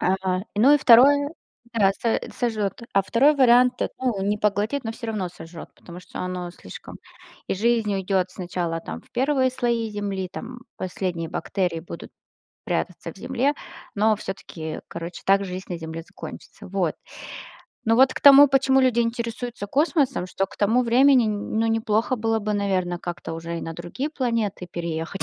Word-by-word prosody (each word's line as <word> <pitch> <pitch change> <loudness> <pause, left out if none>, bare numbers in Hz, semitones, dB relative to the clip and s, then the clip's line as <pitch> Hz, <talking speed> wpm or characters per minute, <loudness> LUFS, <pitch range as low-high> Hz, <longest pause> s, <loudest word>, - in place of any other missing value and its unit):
а, 185 0 0
ну 255 +8 +6
и - - +4
2 280 +4 +6 0.4
да 200 -4 +4
со 230 -1 0
сожжет. 220 -4 -2
А 195 - +3
2 265 +9 +4
вариант 250 -2 +4 0.2
ну, 240 -7 -1
не 205 +1 0
поглотит, 210 +6 0
но 225 - -3
всё 230 0 -7
равно 205 -5 -2
сожжет, 170 -1 -11
потому 175 0 -12
что - - -9
оно 180 -1 -4
слишком - - -11 0.5
И - - 0
жизнь 225 +1 +1
уйдет 190 -1 0
сначала 175 -2 -3
там - - -7
в - - -27
1 260 +1 +1
слои 235 -3 -1
земли, 200 -3 -3
там 245 +1 -8 0.2
последние 180 -3 -3
бактерии 180 -3 -2
будут 170 - -9 0.6
прятаться - - -3
в - - -18
земле, 275 +4 0 0.4
но 215 +1 +3
все-таки, 165 -5 -6
короче, 170 +1 -7
так 195 +1 +3
жизнь 185 0 -6
на 175 - -3
земле 160 0 -6
закончится. - - -11
Вот. 185 -4 -1 0.9
Но 225 +1 +3
вот 260 +1 +5
к - - -5
тому, 285 0 +9
почему 265 0 +3
люди 255 -2 +3
интересуются 235 -1 -3
космосом, 280 - +1
что 190 +1 -1
к - - -16
тому 225 +5 +3
времени, 250 +1 +5
нь - - +1 0.3
ну, 225 - +2
неплохо 225 +2 +1
было 225 0 0
бы, 210 +1 -2
наверное, 185 -3 -1
как-то 175 -1 -6
уже 165 +1 -5
и - - -6
на 165 - -5
другие 260 - -5
планеты 230 - -2
переехать. 170 +2 -4
210 Hz, 170 wpm, -24 LUFS, 185-245 Hz, 0.9 s, тому